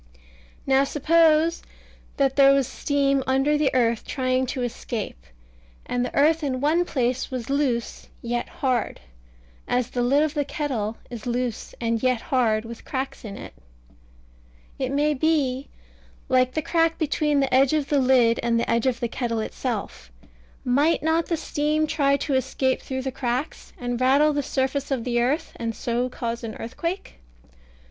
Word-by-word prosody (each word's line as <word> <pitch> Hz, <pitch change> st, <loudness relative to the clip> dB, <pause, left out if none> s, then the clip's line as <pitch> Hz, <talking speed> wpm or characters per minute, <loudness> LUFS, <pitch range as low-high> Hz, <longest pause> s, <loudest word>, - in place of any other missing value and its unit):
Now 270 Hz, 0 st, +4 dB
suppose 320 Hz, +3 st, +3 dB, 0.6 s
that 270 Hz, -1 st, +2 dB
there 275 Hz, -1 st, +7 dB
was 275 Hz, -1 st, +2 dB
steam 275 Hz, -2 st, 0 dB
under 270 Hz, +3 st, +2 dB
the 295 Hz, -2 st, +2 dB
earth 235 Hz, -3 st, +2 dB
trying 255 Hz, -1 st, 0 dB
to 255 Hz, 0 st, -3 dB
escape, 225 Hz, -, -5 dB, 0.6 s
and 245 Hz, 0 st, -1 dB
the 250 Hz, -, -4 dB
earth 310 Hz, +3 st, +3 dB
in 260 Hz, -3 st, -1 dB
one 315 Hz, +6 st, +2 dB
place 255 Hz, -5 st, -1 dB
was 255 Hz, -1 st, -4 dB
loose 265 Hz, -5 st, -1 dB
and -, -, -28 dB, 0.2 s
yet 240 Hz, 0 st, -1 dB
hard, 255 Hz, -3 st, -1 dB, 0.7 s
as 245 Hz, -1 st, 0 dB
the 245 Hz, -, -1 dB
lid 275 Hz, +5 st, +3 dB
of 310 Hz, -1 st, -1 dB
the 295 Hz, -2 st, 0 dB
kettle 260 Hz, -8 st, -3 dB
is 235 Hz, -1 st, -7 dB
loose 245 Hz, -1 st, -3 dB
and 230 Hz, -1 st, -1 dB
yet 255 Hz, -2 st, +2 dB
hard, 225 Hz, -3 st, +1 dB
with 230 Hz, 0 st, -9 dB
cracks 265 Hz, 0 st, -4 dB
in 200 Hz, -3 st, -7 dB
it, -, -, -9 dB, 1.3 s
it 260 Hz, -1 st, -1 dB
may 295 Hz, +2 st, +2 dB
be, 280 Hz, -3 st, 0 dB, 0.6 s
like 255 Hz, -1 st, +3 dB
the 315 Hz, -, 0 dB
crack 330 Hz, 0 st, +1 dB
between 300 Hz, -2 st, +1 dB
the 270 Hz, -2 st, 0 dB
edge 265 Hz, +2 st, +4 dB
of 295 Hz, -2 st, 0 dB
the 290 Hz, -, +3 dB
lid 250 Hz, -3 st, +4 dB
and 235 Hz, -1 st, +1 dB
the -, -, -1 dB
edge 235 Hz, +2 st, +1 dB
of 250 Hz, -2 st, 0 dB
the 240 Hz, -, +1 dB
kettle 230 Hz, -1 st, -2 dB
itself: 215 Hz, -, -4 dB, 0.5 s
might 285 Hz, +7 st, +2 dB
not 320 Hz, +1 st, +1 dB
the 335 Hz, -, 0 dB
steam 305 Hz, 0 st, 0 dB
try 280 Hz, -2 st, +2 dB
to 280 Hz, -, -2 dB
escape 260 Hz, 0 st, 0 dB
through 260 Hz, -1 st, -4 dB
the 265 Hz, -, -2 dB
cracks, 250 Hz, +3 st, -3 dB
and 245 Hz, 0 st, -3 dB
rattle 280 Hz, +4 st, +4 dB
the 290 Hz, -, 0 dB
surface 270 Hz, +1 st, -1 dB
of 265 Hz, -4 st, -1 dB
the 240 Hz, -1 st, 0 dB
earth, 290 Hz, +7 st, 0 dB
and 230 Hz, -1 st, -3 dB
so 245 Hz, +1 st, -1 dB
cause 235 Hz, -1 st, -4 dB
an 220 Hz, -1 st, -5 dB
earthquake? 335 Hz, +11 st, -5 dB
260 Hz, 170 wpm, -24 LUFS, 240-290 Hz, 1.3 s, there